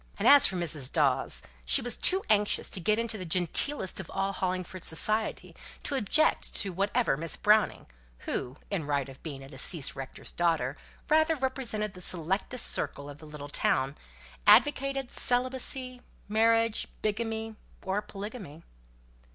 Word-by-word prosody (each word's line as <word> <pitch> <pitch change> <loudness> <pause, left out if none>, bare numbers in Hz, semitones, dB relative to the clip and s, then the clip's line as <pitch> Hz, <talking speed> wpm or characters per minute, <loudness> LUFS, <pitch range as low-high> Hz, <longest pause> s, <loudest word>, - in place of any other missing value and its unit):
And - - 0
as 285 -1 +9
for 190 - -3
Mrs. 155 -6 +2
Dawes, 145 -5 +1 0.2
she - - +5
was 245 -1 -1
too 380 +1 +4
anxious 210 -1 +2
to - - +2
get 210 +4 +1
into 230 -2 -1
the - - -4
genteelest 185 - +1
of 190 - -8
all 195 0 -2
(Hollingford) 185 -1 -4
society 215 +7 +1 0.3
to - - -4
object 275 +5 +1
to 195 -2 -1
whatever 200 - 0
Miss 165 +1 -3
Browning 210 0 +2 0.4
(who, 125 +3 -4
in 170 -7 -3
right 140 -2 -1
of 135 -1 -13
being 140 -4 -8
a - - -11
deceased 140 +2 -1
rector's 135 -1 -6
daughter, 165 -6 0 0.3
rather 315 +1 +3
represented 255 -7 -3
the 180 - -11
selectest 185 +8 -1
circle 140 0 -2
of 145 - -14
the 155 - -13
little 150 -1 -9
town) 135 -1 0 0.5
advocated, 275 -1 +4
whether - - -6
celibacy, 255 0 -1 0.3
marriage, 225 +1 +2 0.2
bigamy, 220 +1 -3 0.3
or 195 +2 -1
polygamy. 200 - -9
200 Hz, 150 wpm, -28 LUFS, 160-235 Hz, 0.5 s, as